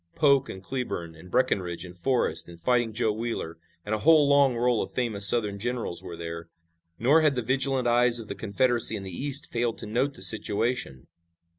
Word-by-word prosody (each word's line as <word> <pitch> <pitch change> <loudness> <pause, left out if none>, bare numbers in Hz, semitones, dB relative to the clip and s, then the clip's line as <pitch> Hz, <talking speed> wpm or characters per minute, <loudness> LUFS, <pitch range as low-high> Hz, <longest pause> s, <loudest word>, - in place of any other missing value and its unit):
Polk 140 -3 +3
and 95 - -9
Cleburne 95 -9 -5
and 80 +3 -15
Breckinridge 90 -7 -1
and 90 0 -12
Forrest 90 -6 0
and 85 -1 -1
Fighting 120 +4 +1
Joe 110 0 0
Wheeler 110 -7 -5 0.3
and 105 - -3
a 110 - -1
whole 155 +2 +5
long 140 -3 +4
roll 120 -1 +1
of - - -5
famous 110 -5 +1
Southern 105 -4 +1
generals 120 -5 -2
were 85 - -9
there. 85 0 -7 0.5
Nor 145 +8 +4
had 150 -3 +2
the 125 - -2
vigilant 135 +1 0
eyes 120 0 +3
of 110 - -9
the - - -5
Confederacy 110 +4 +1
in 100 - -6
the 95 - -7
East 140 +3 0
failed 120 -1 -1
to - - -8
note 125 +6 -1
the - - -7
situation. 110 - 0
115 Hz, 195 wpm, -26 LUFS, 95-130 Hz, 0.5 s, whole